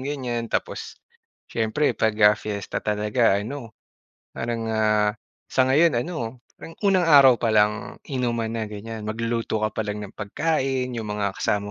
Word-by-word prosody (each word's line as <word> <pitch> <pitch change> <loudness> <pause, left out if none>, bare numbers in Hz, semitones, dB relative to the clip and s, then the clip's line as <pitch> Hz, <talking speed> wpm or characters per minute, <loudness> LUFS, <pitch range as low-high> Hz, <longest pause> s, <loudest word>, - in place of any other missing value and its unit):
ganyan. 125 -4 -3
Tapos, - - -3 0.6
siyempre 115 +6 +1
pag, 110 -1 0
ah, 105 - +8
fiesta 100 -2 -4
talaga 105 0 +2
ano, 115 +1 -6 0.6
parang, 115 -1 -3
ah, 110 -1 +2 0.4
sa 130 - +2
ngayon 150 +3 +4
ano, 130 -8 -5 0.2
parang 165 - -10
unang 185 -3 +4
araw 140 -5 +8
pa 115 - +1
lang 105 0 +1
inuman 120 -4 -1
na 115 -1 -2
ganyan, 105 +1 -7
magluluto 115 0 -2
ka 110 - 0
pa - - +2
lang 105 0 -4
ng 100 - -7
pagkain, 130 +3 -1
'yong 115 -2 -4
mga 105 -1 -1
kasama 105 0 0
115 Hz, 155 wpm, -24 LUFS, 105-130 Hz, 0.6 s, ah